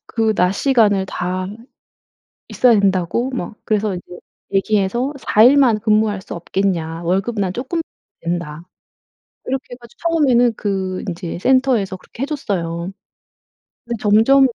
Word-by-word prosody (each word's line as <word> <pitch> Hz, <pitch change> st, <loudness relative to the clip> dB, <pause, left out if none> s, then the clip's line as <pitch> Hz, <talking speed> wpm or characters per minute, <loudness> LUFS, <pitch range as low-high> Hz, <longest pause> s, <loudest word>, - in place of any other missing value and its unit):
그 225 Hz, -1 st, +1 dB
낮시간을 200 Hz, +1 st, +2 dB
다 185 Hz, 0 st, -3 dB, 1.0 s
있어야 240 Hz, -4 st, +4 dB
된다고?' 195 Hz, +6 st, +1 dB
뭐 250 Hz, -3 st, -5 dB
그래서 210 Hz, -2 st, 0 dB
이제 180 Hz, 0 st, -9 dB, 0.3 s
얘기해서 210 Hz, +7 st, +1 dB
"4 215 Hz, -3 st, +3 dB
일만 255 Hz, -3 st, +6 dB
근무할 215 Hz, -2 st, +2 dB
수 -, -, -8 dB
없겠냐? 170 Hz, -2 st, -2 dB
월급은 195 Hz, +5 st, 0 dB
난 185 Hz, -, -1 dB
조금 270 Hz, -, -3 dB, 0.4 s
된다." 170 Hz, -2 st, -4 dB, 0.8 s
이렇게 265 Hz, 0 st, -2 dB
해가지고 240 Hz, -2 st, -17 dB
처음에는 255 Hz, -7 st, +3 dB
그 190 Hz, -2 st, -2 dB
인제 170 Hz, -1 st, -5 dB
센터에서 250 Hz, -4 st, +2 dB
그렇게 235 Hz, +6 st, -11 dB
해줬어요. 185 Hz, -, -3 dB, 0.9 s
근데 235 Hz, 0 st, -3 dB
점점 225 Hz, +6 st, +5 dB
210 Hz, 280 characters per minute, -19 LUFS, 185-245 Hz, 1.0 s, 일만